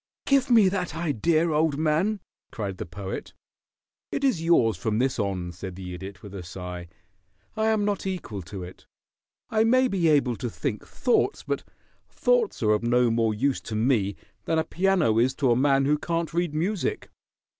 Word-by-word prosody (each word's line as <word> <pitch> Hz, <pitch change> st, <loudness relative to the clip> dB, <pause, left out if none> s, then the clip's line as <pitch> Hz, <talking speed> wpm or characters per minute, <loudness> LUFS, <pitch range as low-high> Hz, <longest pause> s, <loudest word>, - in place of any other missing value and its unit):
"Give 275 Hz, -1 st, +3 dB
me 225 Hz, -5 st, +6 dB
that 185 Hz, -4 st, -2 dB
idea, 165 Hz, +1 st, +1 dB
old 155 Hz, -1 st, +2 dB
man!" 165 Hz, +7 st, +1 dB, 0.3 s
cried 100 Hz, -4 st, -5 dB
the -, -, -5 dB
Poet. 95 Hz, +3 st, -6 dB, 0.8 s
"It -, -, -2 dB
is 260 Hz, -12 st, +2 dB
yours 145 Hz, -, +3 dB
from 105 Hz, +5 st, -1 dB
this 130 Hz, +1 st, 0 dB
on," 95 Hz, -4 st, -2 dB
said 90 Hz, +1 st, -8 dB
the 90 Hz, -1 st, -7 dB
Idiot, 95 Hz, +1 st, -9 dB
with 100 Hz, -2 st, -10 dB
a 100 Hz, -, -6 dB
sigh. 90 Hz, 0 st, -7 dB, 0.7 s
"I 220 Hz, 0 st, +1 dB
am 215 Hz, -2 st, +2 dB
not 200 Hz, -2 st, -1 dB
equal 175 Hz, -, -4 dB
to 90 Hz, +2 st, -8 dB
it. 90 Hz, +1 st, -12 dB, 0.6 s
I 220 Hz, -1 st, +3 dB
may 255 Hz, +3 st, +4 dB
be 185 Hz, -7 st, +1 dB
able 140 Hz, -6 st, +3 dB
to 125 Hz, -, -3 dB
think 115 Hz, -1 st, -4 dB
thoughts, 255 Hz, -, +1 dB
but -, -, -2 dB, 0.5 s
thoughts -, -, +1 dB
are 105 Hz, -, +4 dB
of 105 Hz, -, +2 dB
no 120 Hz, 0 st, +3 dB
more 115 Hz, -1 st, +1 dB
use 135 Hz, +5 st, 0 dB
to 110 Hz, -, -6 dB
me 110 Hz, -4 st, +1 dB, 0.3 s
than 160 Hz, -, +1 dB
a 160 Hz, -, +2 dB
piano 175 Hz, -, +2 dB
is 130 Hz, +3 st, +2 dB
to 135 Hz, -4 st, +2 dB
a -, -, +4 dB
man 135 Hz, +1 st, +3 dB
who 150 Hz, +1 st, +2 dB
can't 165 Hz, 0 st, -2 dB
read 170 Hz, -3 st, -1 dB
music. 180 Hz, +4 st, -2 dB
140 Hz, 185 wpm, -26 LUFS, -, 0.8 s, me